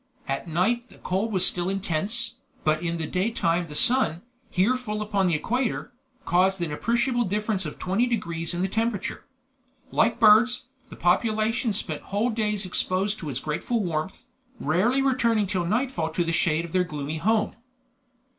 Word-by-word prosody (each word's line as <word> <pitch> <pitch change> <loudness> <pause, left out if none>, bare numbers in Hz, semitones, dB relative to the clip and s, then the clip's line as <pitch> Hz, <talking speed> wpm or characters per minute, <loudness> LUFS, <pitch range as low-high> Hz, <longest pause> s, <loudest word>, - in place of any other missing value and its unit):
At 135 +5 -3
night 220 +10 0
the - - -17
cold 195 +5 -2
was 185 -3 +4
still 175 +1 +3
intense, 195 +5 -1 0.3
but 155 +1 +1
in 170 -1 -2
the 160 - -3
daytime 180 -2 0
the 150 - -8
sun, 235 - +3 0.3
here 200 +8 +2
full 215 -4 -4
upon 205 -3 0
the 170 - +2
equator, 245 - -2 0.3
caused 190 +2 +2
an 170 -3 -2
appreciable 240 - +1
difference 210 -2 -1
of 150 - -8
20 200 +7 0
degrees 170 -8 -2
in 175 - -1
the - - +1
temperature. 220 0 -2 0.7
Like 230 +1 +2
birds, 235 +4 +5 0.2
the - - -10
population 215 +6 +1
spent 175 -7 -1
whole 210 +5 -1
days 210 -3 -1
exposed 190 +3 0
to 155 - -5
its 130 -2 -2
grateful 185 - -2
warmth, 170 +1 -3 0.3
rarely 215 - +2
returning 235 -5 +2
till 185 -3 -1
nightfall 220 -5 0
to 175 - +1
the 165 - -1
shade 165 0 +1
of 170 - -10
their 185 +1 +2
gloomy 150 -2 -5
home. 215 +6 +1
195 Hz, 165 wpm, -25 LUFS, 170-225 Hz, 0.7 s, birds